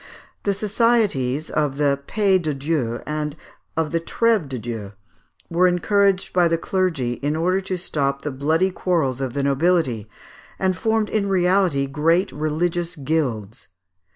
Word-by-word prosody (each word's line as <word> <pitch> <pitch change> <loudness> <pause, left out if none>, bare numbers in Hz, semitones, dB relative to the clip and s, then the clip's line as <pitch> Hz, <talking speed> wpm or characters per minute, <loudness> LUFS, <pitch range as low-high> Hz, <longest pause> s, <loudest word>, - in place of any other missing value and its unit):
The 200 -1 0
societies 200 - +1
of 145 -3 0
the 140 -1 +2
Paix 195 -3 +2
de 155 -2 -1
Dieu, 135 -5 -1
and 150 -1 -3 0.4
of 160 -2 0
the 165 - +1
Trève 220 -3 +1
de 130 - -4
Dieu, 110 -3 -6 0.5
were 175 +2 +3
encouraged 195 +2 +2
by 180 -1 +4
the 165 0 +1
clergy 165 -10 -1
in 145 +2 0
order 180 +4 +1
to 190 -1 -3
stop 140 -5 -2
the 150 - -2
bloody 160 +8 +1
quarrels 155 -9 0
of 130 -3 -2
the 140 - 0
nobility, 140 - +1 0.5
and 190 -1 +1
formed 220 +1 0
in 200 -2 0
reality 180 -6 +2
great 160 +6 +1
religious 170 +3 -1
guilds. 130 -7 -2
160 Hz, 150 wpm, -22 LUFS, 140-185 Hz, 0.5 s, by